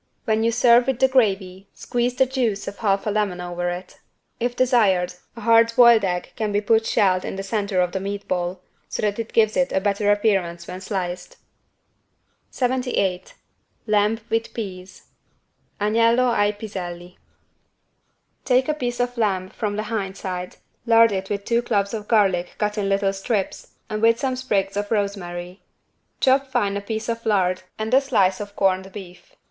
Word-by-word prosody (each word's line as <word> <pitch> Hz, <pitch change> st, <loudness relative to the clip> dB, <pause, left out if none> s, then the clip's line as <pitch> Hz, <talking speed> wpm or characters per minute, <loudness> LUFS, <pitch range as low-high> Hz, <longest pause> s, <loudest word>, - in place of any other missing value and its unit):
When 220 Hz, 0 st, +1 dB
you 230 Hz, +1 st, +2 dB
serve 240 Hz, +1 st, +5 dB
with 265 Hz, -3 st, 0 dB
the 265 Hz, -, +4 dB
gravy 195 Hz, -6 st, 0 dB
squeeze 245 Hz, +1 st, -1 dB
the 265 Hz, -, +4 dB
juice 245 Hz, -6 st, -1 dB
of 200 Hz, -, -7 dB
half 200 Hz, -3 st, +1 dB
a 210 Hz, -, 0 dB
lemon 205 Hz, -4 st, -1 dB
over 175 Hz, 0 st, -3 dB
it. 180 Hz, +1 st, -7 dB, 0.4 s
If 240 Hz, +1 st, -1 dB
desired 210 Hz, -9 st, +2 dB, 0.2 s
a 230 Hz, -, -9 dB
hard 230 Hz, +1 st, +5 dB
boiled 235 Hz, -3 st, +7 dB
egg 180 Hz, -1 st, -2 dB
can 215 Hz, -2 st, -2 dB
be 205 Hz, -, +2 dB
put 220 Hz, +2 st, +2 dB
shelled 185 Hz, -2 st, +2 dB
in -, -, -5 dB
the 195 Hz, -, -5 dB
center 200 Hz, -2 st, -1 dB
of 180 Hz, -1 st, 0 dB
the 190 Hz, -, -2 dB
meat 200 Hz, +1 st, -5 dB
ball, 180 Hz, 0 st, -2 dB, 0.3 s
so -, -, -4 dB
that 210 Hz, +1 st, 0 dB
it 225 Hz, -, -4 dB
gives 215 Hz, -2 st, +3 dB
it 270 Hz, -1 st, +1 dB
a -, -, +2 dB
better 205 Hz, +1 st, +1 dB
appearance 195 Hz, -5 st, 0 dB
when 185 Hz, -, -7 dB
sliced. 180 Hz, -3 st, -4 dB, 1.1 s
78 245 Hz, -8 st, -1 dB, 0.5 s
LAMB 215 Hz, +1 st, +1 dB
WITH 225 Hz, 0 st, -1 dB
PEAS 190 Hz, -4 st, -7 dB, 0.8 s
(Agnello 230 Hz, +4 st, +3 dB
ai 205 Hz, -2 st, +2 dB
piselli) 180 Hz, -4 st, -7 dB, 1.3 s
Take 255 Hz, 0 st, +2 dB
a -, -, +2 dB
piece 245 Hz, -5 st, -3 dB
of 245 Hz, 0 st, -1 dB
lamb 190 Hz, -4 st, 0 dB
from 205 Hz, 0 st, -3 dB
the 210 Hz, -, -2 dB
hind 205 Hz, -3 st, -4 dB
side, 180 Hz, -1 st, -5 dB, 0.3 s
lard 230 Hz, -1 st, +6 dB
it 190 Hz, -1 st, -3 dB
with 200 Hz, -1 st, -3 dB
two 235 Hz, 0 st, +2 dB
cloves 205 Hz, -4 st, -1 dB
of 210 Hz, -2 st, -5 dB
garlic 190 Hz, -6 st, +2 dB
cut 210 Hz, 0 st, -1 dB
in 200 Hz, -2 st, -1 dB
little 195 Hz, 0 st, +1 dB
strips 195 Hz, 0 st, -3 dB
and 215 Hz, 0 st, -4 dB
with 230 Hz, 0 st, +4 dB
some 265 Hz, -2 st, -1 dB
sprigs 200 Hz, -7 st, -1 dB
of 205 Hz, 0 st, -2 dB
rosemary. 185 Hz, -4 st, -3 dB, 0.6 s
Chop 270 Hz, +1 st, +3 dB
fine 240 Hz, -6 st, 0 dB
a 200 Hz, -, -2 dB
piece 220 Hz, +2 st, -4 dB
of 230 Hz, 0 st, -3 dB
lard 185 Hz, -4 st, +1 dB, 0.2 s
and 220 Hz, +2 st, -3 dB
a 265 Hz, -, +6 dB
slice 195 Hz, -9 st, +2 dB
of 205 Hz, -1 st, -7 dB
corned 190 Hz, 0 st, +1 dB
beef. 190 Hz, -, -12 dB
205 Hz, 175 wpm, -22 LUFS, 190-230 Hz, 1.3 s, boiled